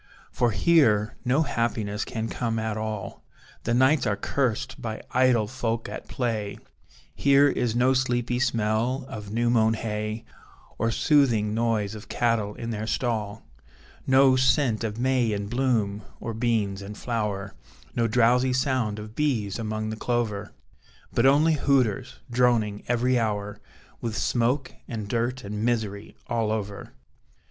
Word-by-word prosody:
For 120 - +2
here, 110 - +3
no 135 +6 +2
happiness 110 -6 -1
can 110 0 -3
come 115 -1 -2
at 110 -1 -2
all, 110 -2 -5 0.4
The 115 - +1
nights 130 +4 +4
are 100 - +1
cursed 125 +2 -2
by 110 -1 -5
idle 125 -3 +3
folk 115 -1 -2
at - - -7
play; 110 -5 -2 0.6
Here 140 0 +5
is 120 -4 0
no 125 +2 +4
sleepy 125 -2 0
smell 120 +1 0
of 105 -4 -7
new 120 +2 +1
mown 110 -1 +3
hay, 110 0 -4 0.5
Or 115 - +1
soothing 115 -5 +3
noise 110 -3 0
of 105 -2 -10
cattle 115 -4 0
in 115 0 -5
their 110 0 -4
stall; 110 -3 -2 0.6
No 130 0 +6
scent 130 -3 +2
of 110 -1 -3
may 125 -2 +2
in 100 0 -2
bloom, 110 -3 0 0.2
or 115 - -4
beans 110 -4 0
in 100 +1 -7
flower, 105 -4 -3 0.4
No 115 -1 +2
drowsy 125 +3 +3
sound 130 -5 0
of 105 0 -8
bees 115 -8 -1
among 110 -1 -3
the - - -3
clover; 110 -3 -2 0.6
But 115 - +4
only 150 +4 +5
hooters, 135 -8 +1
droning 120 -4 +2
every 125 +1 +2
hour; 105 -2 -2 0.4
With 115 -2 -3
smoke 125 +2 0
and 110 -4 -5
dirt 120 +3 -1
and 105 +1 -4
misery 110 -4 -2
all 115 -2 0
over. 105 -2 -4
115 Hz, 145 wpm, -26 LUFS, 105-125 Hz, 0.6 s, No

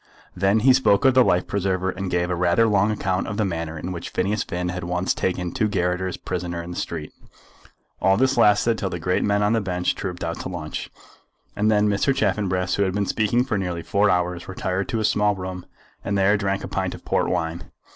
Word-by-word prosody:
Then 100 +4 +2
he 130 +3 +6
spoke 125 -5 +3
of 130 - +6
the 130 0 +6
life 90 -5 +2
preserver, 95 -1 -1
and 95 +1 -4
gave 90 0 0
a - - +1
rather 90 +5 +3
long 105 -1 +3
account 95 -3 -1
of 105 - -4
the 110 - +1
manner 85 -3 -3
in 85 +4 -5
which 85 -2 -6
Phineas 105 +4 -1
Finn 90 0 -3
had 90 0 -4
once 90 +2 0
taken 90 -1 -2
two 110 - 0
garotters 90 -1 -1
prisoner 90 -1 -4
in 85 - -8
the - - -6
street. 80 -3 -4 0.9
All 95 0 +4
this 130 +3 +2
lasted 115 0 +3
till 95 - -1
the 90 - -4
great 90 +2 0
men 105 0 +2
on 105 +2 +2
the 115 - +2
bench 90 -2 -1
trooped 90 -3 -5
out 85 0 -3
to - - -5
lunch. 80 -4 -5 0.7
And 105 +1 +2
then 105 -1 +3
Mr. 105 +7 +1
Chaffanbrass, 95 -5 0
who 100 - +3
had 95 -2 0
been 100 0 +1
speaking 115 +4 +1
for 110 -6 -1
nearly 90 -3 -3
four 105 0 +2
hours, 90 -1 0
retired 95 0 -3
to 115 - -1
a 110 - 0
small 105 0 +2
room 90 -1 -6 0.4
and 100 - -1
there 100 +2 +4
drank 100 -1 -1
a - - -4
pint - - -2
of - - -15
port - - +1
wine. 85 -1 -3
95 Hz, 225 wpm, -23 LUFS, 90-105 Hz, 0.9 s, he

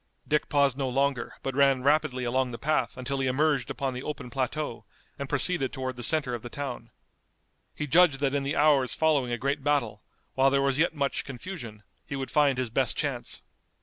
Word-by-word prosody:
Dick 150 0 +1
paused 140 -2 +2
no 135 -1 0
longer, 135 -1 0
but 135 - -2
ran 135 -1 +3
rapidly 145 -3 +2
along 125 +1 0
the 120 - -6
path 145 -4 -1
until 135 +2 -3
he 135 - 0
emerged 145 +3 +1
upon 135 -2 -2
the 125 - -5
open 140 -4 -6
plateau 135 -1 -3 0.4
and 140 -1 -5
proceeded 145 -1 +2
toward 130 -2 -4
the 120 - -8
center 140 0 +2
of 120 - -4
the 120 - -8
town. 140 -1 -6 0.9
He 150 - -3
judged 155 -1 +4
that 140 -1 0
in 140 - +1
the 140 +2 -2
hours 140 -6 +3
following 145 -6 +2
a 120 - 0
great 140 +3 -2
battle, 130 -8 0 0.3
while 135 +1 +4
there 140 0 +2
was 135 0 +1
yet 165 0 +2
much 140 -2 -1
confusion, 120 - -8 0.2
he 140 - -4
would 135 -1 -4
find 145 -3 +3
his 125 -3 -2
best - - 0
chance. - - -3
135 Hz, 205 wpm, -27 LUFS, 130-145 Hz, 0.9 s, judged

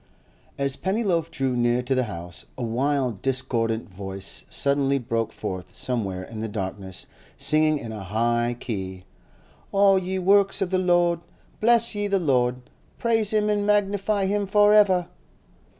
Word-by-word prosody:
As 140 -1 0
Pennyloaf 190 -5 0
drew 135 -5 -1
near 120 +1 +1
to 135 - 0
the 130 -1 +1
house, 85 -4 -8
a 125 - -4
wild, 125 -2 -1
discordant 120 -4 -1
voice 95 0 -5
suddenly 140 0 +1
broke 115 -3 -2
forth 90 -1 -6
somewhere 100 -7 -2
in 110 +3 -8
the 110 - -3
darkness, 95 -2 -5 0.3
singing 155 0 +3
in 115 -5 -7
a 105 -3 -6
high 120 +4 0
key, 95 -6 -5 0.7
'All 195 -1 +5
ye 190 +1 -3
works 195 +1 +3
of 190 -2 -1
the 185 - +2
Lord, 175 -2 +2 0.4
bless 235 +1 +4
ye 205 0 -1
the 200 -1 +2
Lord, 125 -7 +1 0.4
praise 225 -3 +1
Him 210 -1 +2
and 205 -1 +1
magnify 205 0 +1
Him 200 +1 0
for 205 +1 +5
ever! 190 -4 +4
140 Hz, 150 wpm, -24 LUFS, -, 0.7 s, All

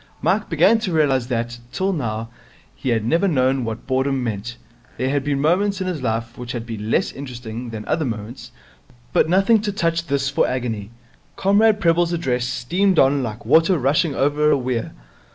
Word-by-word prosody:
Mike 205 +2 0
began 185 +8 +4
to 200 -4 -3
realize 140 -6 +2
that, 120 -1 -3
till 195 +1 -1
now, 115 -7 -3 0.4
he 130 - -4
had 115 -2 +1
never 170 - +2
known 130 -5 +1
what 115 -1 -5
boredom 130 0 0
meant. 115 +1 -4 0.4
There 130 +2 -1
had 140 -1 0
been 140 -1 -1
moments 190 +7 +1
in 190 - -2
his 180 -6 -3
life 115 0 -3
which 125 0 -6
had 120 -2 -4
been 110 -2 -6
less - - +1
interesting 125 -3 -7
than 110 -2 -7
other 160 0 0
moments, 115 -1 -6 0.6
but - - +3
nothing 195 +4 +4
to 210 -1 -2
touch 165 -3 -1
this 140 0 0
for 135 - +1
agony. 115 -5 -3 0.5
Comrade 210 +2 +3
Prebble's 170 -1 +2
address 125 -7 -1
streamed 180 +10 0
on 135 0 +4
like 115 -2 -5
water 165 +3 +4
rushing 140 +2 +1
over 150 +2 +2
a 150 - +4
weir. 125 -3 -3
135 Hz, 185 wpm, -21 LUFS, 120-170 Hz, 0.6 s, began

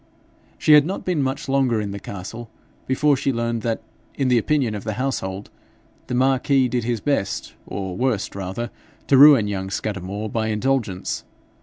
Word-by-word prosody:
She 155 - +4
had 150 -1 +8
not 190 - -4
been 180 -5 0
much 135 0 -2
longer 135 -4 +2
in 105 -1 -3
the 100 - -5
castle 105 +4 -8 0.4
before 145 +2 +3
she 135 0 0
learned 115 -1 -1
that, 115 0 -2 0.3
in 135 -2 0
the 125 -1 +4
opinion 135 -2 +1
of 105 - -5
the 110 - -3
household, 100 -6 -3 0.6
the 125 - -2
marquis 130 +1 +3
did 125 -1 -1
his 120 -1 -1
best, 140 -9 -1
or 95 -2 -4
worst 115 -3 -1
rather, 100 +5 -4 0.3
to 140 - +3
ruin 135 -5 +8
young 95 -2 -3
Scudamore 100 +1 -3
by 110 +1 -1
indulgence. 110 -4 -1
120 Hz, 170 wpm, -22 LUFS, 100-135 Hz, 0.6 s, had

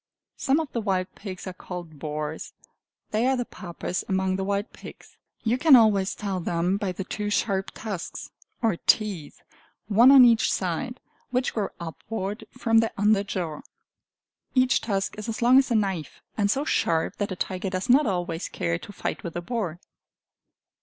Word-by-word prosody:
Some 275 +3 +2
of 315 -3 -4
the 235 - -2
wild 190 -3 -1
pigs 190 -3 -8
are 185 - -5
called 175 -4 -8
boars; 150 +1 -4 0.6
they 220 +4 +2
are 265 0 +2
the 245 - -1
Papas 175 -2 -5
among 190 -1 +1
the 190 - -2
wild 200 +2 -2
pigs. - - -12 0.3
You 240 +2 +1
can 305 -2 +8
always 210 -5 +4
tell 195 -3 -3
them 175 +2 0
by 200 -2 -2
the 185 +2 -5
two 210 +2 -4
sharp 195 -2 0
tusks, 200 -6 -6 0.3
or 220 -6 +2
teeth, 195 -9 0 0.4
one 225 +5 +6
on 270 -2 +9
each 230 -2 +4
side, 190 +8 -2 0.3
which 250 +1 0
grow 210 -3 -1
upward 195 +6 -5
from 225 -3 +2
their 225 0 +2
under 205 0 +3
jaw. 175 -6 -4 0.9
Each 255 -1 +4
tusk 200 -1 -2
is 210 - -5
as 225 +1 -3
long 255 +2 +7
as 270 - +1
a 235 - +1
knife, 190 -8 -2
and 205 -2 +1
so 275 +7 +1
sharp 165 - +1
that 205 -1 -2
a - - -2
tiger 185 +1 -3
does 185 +3 -3
not 265 +2 +5
always 175 -3 -2
care 85 0 -2
to - - -10
fight 200 - -4
with 170 - -6
a 175 - -2
boar. 195 -7 -3
200 Hz, 180 wpm, -26 LUFS, 180-225 Hz, 0.9 s, on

